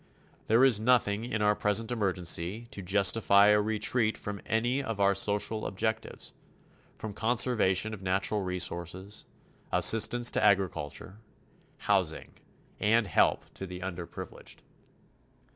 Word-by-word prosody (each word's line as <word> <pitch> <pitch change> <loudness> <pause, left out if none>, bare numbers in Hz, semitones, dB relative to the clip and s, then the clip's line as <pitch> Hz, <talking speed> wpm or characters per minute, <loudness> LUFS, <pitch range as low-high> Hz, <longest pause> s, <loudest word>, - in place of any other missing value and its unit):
There 115 +4 +5
is 120 -6 +4
nothing 110 -2 +1
in 110 -3 -2
our 105 0 +3
present 110 +3 +1
emergency 95 0 -2
to 100 - -7
justify 100 +2 +4
a 105 0 +4
retreat 110 +1 -1
from 100 -1 -7
any 120 +5 0
of 115 -6 -5
our 100 0 +3
social 105 +2 -1
objectives 110 +3 -4 0.6
from 110 -2 -7
conservation 110 -3 +1
of 105 - -8
natural 95 +2 -1
resources, 90 +1 -4 0.5
assistance 120 +2 +4
to - - -1
agriculture, 95 -2 -1 0.6
housing, 95 -6 -1 0.5
and 115 +2 +2
help 95 - +1
to 95 - -7
the 90 0 -8
underprivileged. 90 -2 -8
105 Hz, 120 wpm, -29 LUFS, 95-110 Hz, 0.6 s, There